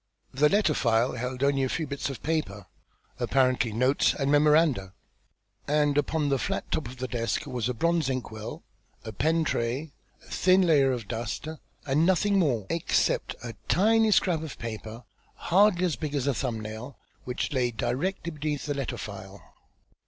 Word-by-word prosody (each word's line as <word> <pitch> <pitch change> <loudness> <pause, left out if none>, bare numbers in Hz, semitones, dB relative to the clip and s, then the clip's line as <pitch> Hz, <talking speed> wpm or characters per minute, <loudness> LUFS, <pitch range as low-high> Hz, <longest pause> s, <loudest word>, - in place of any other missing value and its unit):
The 150 +3 +4
letter 200 -5 +3
file 115 -1 +2
held 125 +2 -4
only 140 -1 +2
a 130 - 0
few 160 - -2
bits 140 0 -4
of 135 - -7
paper, 150 -11 -2 0.5
apparently 130 -4 +2
notes 125 +6 +2
and 140 0 0
memoranda; 145 - +3 0.7
and 150 -1 +2
upon 145 0 +1
the 135 -1 +1
flat - - -3
top 155 - -1
of 125 +2 -10
the 130 +1 -3
desk 115 -2 -2
was 125 -4 -2
a 125 - -2
bronze 170 +1 +1
ink 130 -3 -3
well, 110 0 -7 0.4
a 110 - -6
pen 160 - +1
tray, 135 +2 -2 0.3
a - - -17
thin 185 +1 +4
layer 145 -6 +4
of 120 -5 -4
dust 115 +6 -4 0.4
and 145 +3 +2
nothing 190 +3 +3
more, 125 - +1
except 165 - 0
a 115 -1 -6
tiny 220 +3 +4
scrap 180 -6 +2
of 160 -5 -7
paper 115 0 -7 0.3
hardly 185 0 +3
as 160 -9 -1
big 150 +3 -4
as 135 -2 0
a 140 - +2
thumb 120 -3 -2
nail, 110 +5 -7 0.3
which 125 +3 -3
lay 125 -3 +1
directly 170 - -2
beneath 150 -1 -3
the 145 - -1
letter 140 -2 -3
file. 100 -1 -8
140 Hz, 175 wpm, -27 LUFS, 120-160 Hz, 0.7 s, The